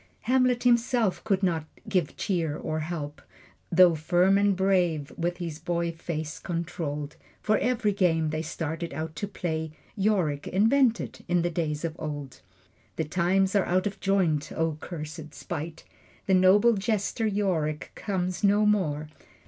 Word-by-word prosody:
Hamlet 255 -1 +2
himself 235 -4 +2
could 200 -3 0
not 165 -4 +1 0.2
give 185 -7 0
cheer 165 -6 -1
or 155 0 -3
help, 155 -2 -5 0.5
Though 180 0 +7
firm 175 +5 +3
and 200 -1 +3
brave, 180 -6 +1
with 175 +1 -2
his 165 -3 -5
boy 170 0 -1
face 160 -2 -5
controlled. 165 -4 -4 0.2
For 215 0 +2
every 235 -5 +1
game 165 -5 +2
they 155 0 -2
started 165 +1 -4
out 160 0 -4
to 205 - -2
play 160 -5 -3 0.2
Yorick 190 -9 +1
invented, 230 +4 +2
in 175 -1 +2
the 175 - 0
days 160 -2 -2
of 160 -1 -3
old. 145 -3 -6 0.5
The 160 - -1
times 185 +4 +1
are 200 - +3
out 185 +2 +1
of 200 -1 -3
joint! 175 -7 +1
O 160 -1 0
cursed 155 -2 -7
spite! 160 -1 -6 0.4
The 190 - +2
noble 190 +5 +6
jester 210 +2 -1
Yorick 180 -8 -1
comes 185 -2 -3
no 205 +1 +4
more. 155 -8 +1
175 Hz, 150 wpm, -27 LUFS, 160-200 Hz, 0.5 s, Though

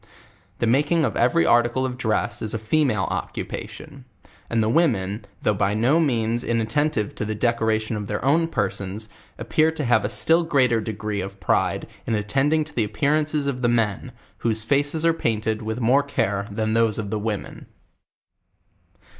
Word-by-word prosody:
The - - 0
making 145 +7 +2
of - - -2
every 120 -9 +3
article 120 +6 +3
of 130 -1 -3
dress 110 -4 -1
is 110 0 -1
a - - 0
fe 110 +9 +1
male 110 -9 0
occupation; 135 -3 -6 0.4
and 115 -2 +1
the - - 0
women, 110 - +1 0.2
though 105 - +3
by 100 +1 0
no 125 +9 +3
means 120 -6 0
inat 115 -1 -1
tentive 145 -5 0
to - - -4
the 110 +1 -3
decoration 110 -1 0
of 105 -1 -4
their 105 +4 -3
own 165 +4 +3
persons, 105 - -3 0.3
appear 155 +1 +2
to 150 -3 -3
have 120 -3 +3
a 105 - -1
still 165 +8 +2
greater 130 -8 +2
degree" 105 -1 -4
of 95 +1 -7
pride 90 - 0 0.2
in 115 - +1
attending 135 +10 +1
to 150 - -11
the 115 - +1
ap 105 - -10
pearances 150 0 +1
of 135 -3 -2
the 120 - +2
men, 115 -5 0 0.3
"whose 110 -2 +3
faces 145 +6 +1
are 165 - +4
painted 110 -6 -1
with 110 +2 -4
more 125 +4 +4
care 100 -8 -2
than 110 +1 -2
those 115 -2 +2
of 105 -3 -4
the 110 - -1
women. 105 -1 -5
115 Hz, 180 wpm, -23 LUFS, 105-140 Hz, 0.4 s, are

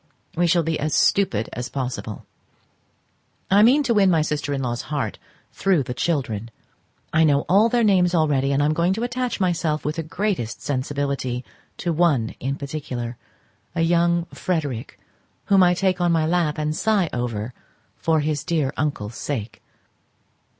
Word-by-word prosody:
We 175 +1 +2
shall 170 0 +3
be 160 0 -1
as 155 +1 0
stupid 115 - +2
as 125 +1 -4
possible. 125 -6 -5 1.3
I 200 +2 +6
mean 260 +7 +5
to 240 -3 +1
win 200 -3 +4
my 165 -4 +3
sister 150 -1 -2
in 135 -1 -1
law's 120 -1 -2
heart 145 -3 -2 0.3
through 185 -7 +2
the 125 - -5
children; 120 -7 -2 0.6
I 160 - +4
know 145 -2 +4
all 205 +8 +4
their 240 0 +2
names 180 -4 +3
already, 140 -4 +2
and 140 +1 +2
am 150 +1 +2
going 170 +4 +2
to 225 +4 -3
attach 245 -1 -2
myself 170 -5 0
with 150 +2 -2
the - - 0
greatest 165 - -2
sensibility 135 -2 -2 0.3
to 170 -2 -1
one 150 -9 +2
in 135 +2 -2
particular, 135 -5 -5 0.6
a 165 - +1
young 170 0 +2
Frederic, 145 -10 -3 0.5
whom 195 -1 +4
I 180 -1 +5
take 185 0 0
on 175 -1 +3
my 160 -2 +2
lap 165 -2 +1
and 155 0 -1
sigh 210 -3 +2
over 120 -1 -3 0.4
for 160 -2 +1
his 145 -1 -1
dear 155 -5 0
uncle's 120 -8 -2
sake. 115 -6 -4
155 Hz, 165 wpm, -23 LUFS, 135-175 Hz, 1.3 s, I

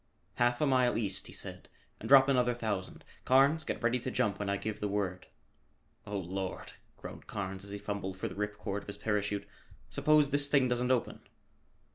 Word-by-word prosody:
"Half 120 0 +2
a - - +4
mile 130 -3 +3
east," 100 -4 -2
he - - -11
said, - - -6 0.3
"and - - -6
drop 135 -1 +8
another 125 -3 +2
thousand. 105 -6 -4 0.2
Carnes, 140 +5 +4
get - - -4
ready 120 +2 +2
to 125 - -4
jump 100 -5 0
when 100 -1 -2
I 100 - +1
give 110 +1 -4
the 105 - -1
word." 100 -3 -2 0.8
"Oh, 100 0 -3
Lord!" 95 +1 -4 0.2
groaned - - -10
Carnes 95 -1 -4
as 100 - -9
he 100 - -4
fumbled 100 -2 -4
for - - -3
the - - -7
rip 105 0 -3
cord 100 0 -3
of - - -17
his 100 - -5
parachute, 105 -1 -1 0.4
"suppose 150 -2 +3
this 145 0 +3
thing 140 -3 +4
doesn't 125 0 0
open?" 130 -2 0
105 Hz, 195 wpm, -32 LUFS, 100-130 Hz, 0.8 s, drop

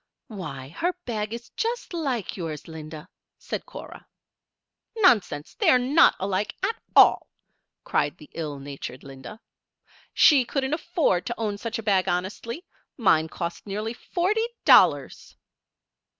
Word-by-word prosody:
"Why, 140 - -7
her 345 - -1
bag 215 -3 -3
is 235 +1 -7
just 470 -3 -3
like 270 - -2
yours, 160 -5 -6
Linda," 155 0 -9 0.3
said - - -6
Cora. - - -11 0.9
"Nonsense! 225 - +3
They're 255 - +4
not 270 +7 +4
alike, 195 +1 -2
at 430 +4 0 0.2
all," - - +6 0.5
cried 145 - 0
the 150 - -14
ill 150 -3 -4
natured 135 -1 -8
Linda. 135 +9 -10 0.7
"She 285 -5 +6
couldn't 265 +3 -2
afford 315 - 0
to 240 - -3
own 210 -3 -3
such 230 +2 -4
a 225 - -6
bag 195 -3 +2
honestly. 205 - -3 0.3
Mine 160 - +3
cost 170 +4 -5
nearly 210 +3 -3
forty 395 - -1 0.2
dollars." - - +4
210 Hz, 130 wpm, -25 LUFS, 160-265 Hz, 0.9 s, all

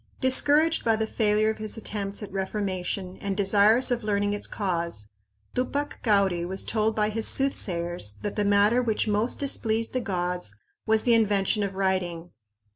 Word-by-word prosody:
Discouraged 295 +5 +3
by 225 -1 +3
the 220 0 -1
failure 215 -1 +1
of 220 - -9
his 215 +1 -4
attempts 205 -1 -4
at 205 - -8
reformation 190 -1 -3
and 200 -1 -4
desirous 210 +5 +4
of 240 -2 -1
learning 205 -1 0
its 205 - -3
cause, 170 - -3 0.4
Tupac 280 +3 -2
Cauri 195 -6 +2
was 190 +2 -3
told 220 0 0
by 210 -1 +1
his 220 +1 -3
soothsayers 175 - 0
that 205 - -3
the 210 - 0
matter 205 +4 +3
which 225 -2 -1
most 215 +3 +1
displeased 230 -5 -1
the 255 - 0
gods 180 - -3 0.3
was 220 0 +3
the 240 - +3
invention 210 -1 +2
of 200 -1 -2
writing. 180 -3 -2
205 Hz, 165 wpm, -26 LUFS, 190-225 Hz, 0.4 s, desirous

